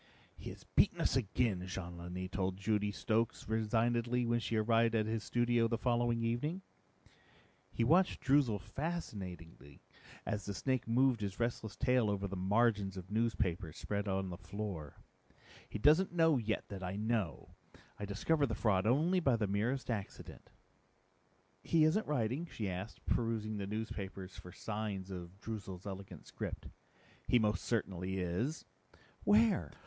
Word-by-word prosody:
"He -, -, -7 dB
has -, -, -10 dB
beaten -, -, +3 dB
us -, -, +2 dB
again," 110 Hz, -5 st, +1 dB
Jean 90 Hz, -1 st, -5 dB
Lanni 90 Hz, +2 st, -5 dB
told 95 Hz, 0 st, -2 dB
Judy 105 Hz, +1 st, +1 dB
Stokes 110 Hz, +2 st, 0 dB
resignedly 115 Hz, +2 st, +1 dB
when 120 Hz, 0 st, +2 dB
she 115 Hz, -, -2 dB
arrived 115 Hz, +1 st, +3 dB
at 110 Hz, -1 st, +2 dB
his 110 Hz, 0 st, -2 dB
studio 120 Hz, -1 st, +2 dB
the 115 Hz, 0 st, 0 dB
following 120 Hz, -1 st, +1 dB
evening. 150 Hz, +11 st, -1 dB, 1.1 s
He 115 Hz, -, 0 dB
watched 175 Hz, +9 st, +4 dB
Droozle 135 Hz, -6 st, +3 dB
fascinatedly 95 Hz, -, -6 dB, 0.4 s
as 105 Hz, -2 st, -2 dB
the 100 Hz, -, -4 dB
snake 130 Hz, +6 st, 0 dB
moved 125 Hz, 0 st, +3 dB
his 100 Hz, 0 st, -3 dB
restless 115 Hz, -2 st, -2 dB
tail 125 Hz, -4 st, +3 dB
over 100 Hz, -1 st, -1 dB
the 100 Hz, -, -5 dB
margins 100 Hz, 0 st, +2 dB
of 95 Hz, +1 st, -8 dB
newspapers 95 Hz, -8 st, 0 dB
spread 100 Hz, 0 st, -2 dB
on 95 Hz, -1 st, -1 dB
the 90 Hz, -, -7 dB
floor. 95 Hz, -6 st, -5 dB, 0.7 s
"He -, -, -4 dB
doesn't 155 Hz, -, +5 dB
know 165 Hz, -5 st, +4 dB
yet 110 Hz, -1 st, -2 dB
that 100 Hz, -2 st, -6 dB
I 90 Hz, +1 st, -3 dB
know. 110 Hz, -3 st, -1 dB, 0.5 s
I 105 Hz, -, -3 dB
discovered 140 Hz, +9 st, +1 dB
the 115 Hz, -, -2 dB
fraud 105 Hz, -2 st, +2 dB
only 160 Hz, +10 st, +3 dB
by 135 Hz, -8 st, +3 dB
the 110 Hz, -2 st, 0 dB
merest 115 Hz, +7 st, 0 dB
accident." 105 Hz, -4 st, -6 dB, 1.1 s
"He 165 Hz, -2 st, +3 dB
isn't 170 Hz, +8 st, +3 dB
writing?" 140 Hz, +3 st, 0 dB
she 105 Hz, -, -3 dB
asked, 95 Hz, +3 st, -5 dB
perusing 110 Hz, -2 st, 0 dB
the 100 Hz, -, -3 dB
newspapers 100 Hz, -3 st, -5 dB
for 90 Hz, -, -10 dB
signs 105 Hz, -2 st, -4 dB
of 90 Hz, +1 st, -7 dB
Droozle's 100 Hz, -5 st, -6 dB
elegant 95 Hz, -4 st, -7 dB
script. -, -, -6 dB, 0.6 s
"He 125 Hz, -, +5 dB
most 105 Hz, -2 st, +1 dB
certainly 95 Hz, -4 st, -1 dB
is." 95 Hz, -, -2 dB, 0.6 s
"Where?" 105 Hz, -8 st, +4 dB
110 Hz, 150 wpm, -35 LUFS, 95-120 Hz, 1.1 s, doesn't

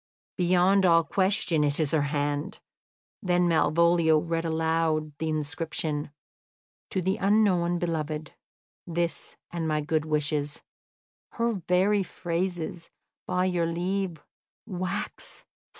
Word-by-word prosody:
Beyond 185 Hz, +2 st, +3 dB
all 165 Hz, -2 st, +5 dB
question 185 Hz, -2 st, +2 dB
it 145 Hz, +1 st, 0 dB
is 155 Hz, -3 st, +1 dB
her 160 Hz, -, +3 dB
hand." 145 Hz, +1 st, -2 dB, 0.6 s
Then 180 Hz, -1 st, +2 dB
Malvolio 170 Hz, 0 st, +4 dB
read 165 Hz, +1 st, -1 dB
aloud 160 Hz, -2 st, 0 dB
the 160 Hz, -, -1 dB
inscription: 155 Hz, -1 st, -2 dB, 0.8 s
"'To 185 Hz, -, -1 dB
the 190 Hz, +3 st, +1 dB
unknown 190 Hz, -4 st, +3 dB
beloved, 155 Hz, -3 st, -3 dB, 0.5 s
this, 170 Hz, 0 st, -2 dB
and 170 Hz, -2 st, -2 dB
my 155 Hz, -1 st, +1 dB
good 155 Hz, +1 st, 0 dB
wishes.' 150 Hz, -1 st, -1 dB, 0.7 s
Her 235 Hz, 0 st, +1 dB, 0.2 s
very 195 Hz, +3 st, +3 dB
phrases! 175 Hz, -1 st, -3 dB, 0.4 s
By 180 Hz, 0 st, +1 dB
your 175 Hz, -2 st, +1 dB
leave, 175 Hz, -1 st, -2 dB, 0.4 s
wax. 185 Hz, -1 st, -5 dB
170 Hz, 110 wpm, -27 LUFS, 155-180 Hz, 0.8 s, all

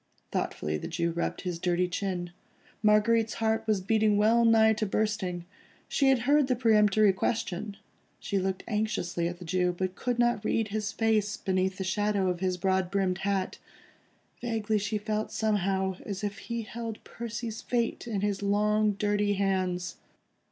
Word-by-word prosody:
Thoughtfully 75 Hz, 0 st, -2 dB
the -, -, -5 dB
Jew 170 Hz, 0 st, -1 dB
rubbed 170 Hz, +1 st, -2 dB
his 175 Hz, -3 st, -4 dB
dirty 180 Hz, 0 st, +1 dB
chin. 180 Hz, -1 st, -3 dB, 0.5 s
Marguerite's 220 Hz, +1 st, +3 dB
heart 225 Hz, 0 st, 0 dB
was 210 Hz, -3 st, +2 dB
beating 215 Hz, +1 st, +2 dB
well 225 Hz, +3 st, +4 dB
nigh 220 Hz, -1 st, +6 dB
to 215 Hz, 0 st, -2 dB
bursting. 195 Hz, -4 st, -1 dB, 0.4 s
She 275 Hz, -2 st, +2 dB
had 265 Hz, -3 st, +3 dB
heard 285 Hz, +3 st, +3 dB
the 255 Hz, -, +2 dB
peremptory 215 Hz, -3 st, +4 dB
question; 200 Hz, 0 st, -2 dB, 0.4 s
she 200 Hz, -, -1 dB
looked 190 Hz, 0 st, -2 dB
anxiously 210 Hz, -6 st, -1 dB
at 175 Hz, 0 st, -5 dB
the 175 Hz, -, -10 dB
Jew, 180 Hz, +1 st, +1 dB
but 185 Hz, 0 st, -1 dB
could 245 Hz, +5 st, -2 dB
not 240 Hz, -3 st, +2 dB
read 215 Hz, 0 st, 0 dB
his 210 Hz, 0 st, -2 dB
face 215 Hz, -2 st, +1 dB
beneath 190 Hz, -1 st, 0 dB
the 190 Hz, -, -3 dB
shadow 200 Hz, 0 st, +1 dB
of 175 Hz, -, -5 dB
his 185 Hz, -1 st, 0 dB
broad 190 Hz, 0 st, +1 dB
brimmed 190 Hz, -1 st, 0 dB
hat. 195 Hz, -1 st, -1 dB, 0.8 s
Vaguely 220 Hz, -3 st, 0 dB
she 210 Hz, +1 st, -1 dB
felt 215 Hz, +1 st, -2 dB
somehow 190 Hz, -3 st, 0 dB
as 200 Hz, 0 st, -5 dB
if 205 Hz, 0 st, -3 dB
he 235 Hz, -1 st, -4 dB
held 225 Hz, 0 st, -6 dB
Percy's 235 Hz, -1 st, -6 dB
fate 240 Hz, -1 st, -1 dB
in 210 Hz, -4 st, -2 dB
his 205 Hz, -1 st, -1 dB
long, 210 Hz, +1 st, +2 dB
dirty 205 Hz, 0 st, +1 dB
hands. 185 Hz, -3 st, -1 dB
205 Hz, 165 wpm, -29 LUFS, 185-220 Hz, 0.8 s, nigh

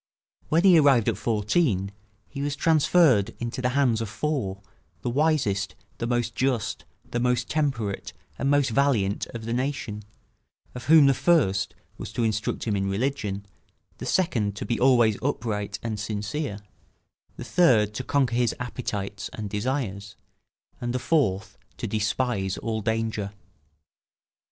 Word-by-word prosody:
When 165 Hz, +3 st, +3 dB
he 185 Hz, -4 st, +7 dB
arrived 135 Hz, -7 st, +4 dB
at -, -, -2 dB
fourteen 105 Hz, -, +1 dB, 0.4 s
he 140 Hz, -, -7 dB
was 145 Hz, 0 st, -1 dB
transferred 155 Hz, -, +3 dB
into 120 Hz, +2 st, -4 dB
the 125 Hz, -, +1 dB
hands 120 Hz, -5 st, +3 dB
of 110 Hz, -, -3 dB
four, 110 Hz, -8 st, -2 dB, 0.4 s
the 120 Hz, -, -1 dB
wisest, 130 Hz, -9 st, +1 dB, 0.2 s
the 115 Hz, -, -2 dB
most 120 Hz, -1 st, 0 dB
just, 130 Hz, -4 st, -1 dB, 0.3 s
the 120 Hz, -, -1 dB
most 125 Hz, 0 st, +1 dB
temperate, 135 Hz, -10 st, -1 dB, 0.3 s
and 135 Hz, -, +1 dB
most 145 Hz, -3 st, +3 dB
valiant 110 Hz, -6 st, +1 dB
of 115 Hz, -1 st, -6 dB
the 115 Hz, -, -2 dB
nation; 125 Hz, -4 st, -2 dB, 0.7 s
of 125 Hz, -, -8 dB
whom 155 Hz, 0 st, +7 dB
the 135 Hz, -, +5 dB
first 125 Hz, -, +2 dB, 0.2 s
was -, -, -6 dB
to 120 Hz, -, -1 dB
instruct 110 Hz, -1 st, -1 dB
him 105 Hz, -3 st, 0 dB
in 95 Hz, 0 st, -1 dB
religion, 100 Hz, -2 st, -2 dB, 0.5 s
the -, -, -5 dB
second 115 Hz, -, +1 dB
to -, -, -5 dB
be 120 Hz, -, -1 dB
always 120 Hz, -4 st, +4 dB
upright 110 Hz, -7 st, -2 dB
and 110 Hz, -2 st, -3 dB
sincere, 105 Hz, +3 st, -3 dB, 0.8 s
the -, -, -6 dB
third 110 Hz, -, +3 dB
to 130 Hz, -, -4 dB
conquer 130 Hz, -3 st, +1 dB
his 120 Hz, -2 st, +1 dB
appetites 105 Hz, -6 st, -4 dB
and 105 Hz, -2 st, -6 dB
desires, 105 Hz, -3 st, -3 dB, 0.7 s
and 120 Hz, 0 st, -2 dB
the -, -, +3 dB
fourth 125 Hz, -, 0 dB, 0.2 s
to -, -, -4 dB
despise 110 Hz, -2 st, -1 dB
all 110 Hz, -1 st, -3 dB
danger. 110 Hz, -2 st, -2 dB
120 Hz, 145 wpm, -26 LUFS, 105-135 Hz, 0.8 s, he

